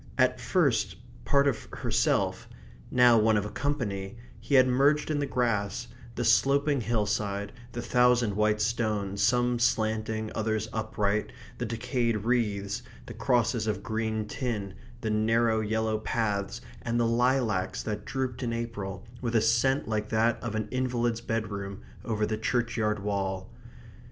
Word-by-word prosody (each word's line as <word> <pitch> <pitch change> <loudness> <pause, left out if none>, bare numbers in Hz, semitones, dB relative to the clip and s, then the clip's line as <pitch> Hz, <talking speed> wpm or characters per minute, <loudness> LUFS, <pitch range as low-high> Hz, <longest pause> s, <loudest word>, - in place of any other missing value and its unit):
At - - +3
first, 115 - +1 0.3
part 140 0 +4
of 130 -5 -1
herself; - - 0 0.4
now 120 -2 +6
one 110 0 +4
of 105 - 0
a 105 - -6
company, 115 -8 -2 0.2
he 140 - 0
had 130 -1 +7
merged 140 +5 +3
in 150 - 0
the 145 - -1
grass, 120 -2 -1 0.3
the 120 - -1
sloping 140 +4 +3
hillside, 105 -2 -1 0.2
the 120 - -4
thousand 125 -4 +3
white 105 0 +2
stones, 105 -3 -1
some 120 -1 +2
slanting, 110 -1 0
others 110 -1 -1
upright, 105 -1 -1 0.3
the 120 - -2
decayed 115 -1 -1
wreaths, 105 -5 0 0.2
the - - -8
crosses 120 -3 +1
of 100 -2 -2
green 110 -1 -2
tin, 105 -5 -3 0.3
the 110 - -1
narrow 110 +1 +2
yellow 110 0 0
paths, 105 -3 -1 0.2
and 115 +1 -1
the 120 - +3
lilacs 115 -4 +1
that 105 -1 -3
drooped 130 -2 -3
in 120 -2 -1
April, 105 -5 -5 0.2
with 120 -2 -2
a 110 - +5
scent 120 +5 +2
like 105 -1 -2
that 115 +1 +2
of 115 -2 -4
an 110 -1 -2
invalid's 120 -2 0
bedroom, 105 -4 -3 0.2
over 110 -2 0
the 110 0 -2
churchyard 115 -2 0
wall. 95 -1 -3
110 Hz, 145 wpm, -28 LUFS, 105-120 Hz, 0.4 s, had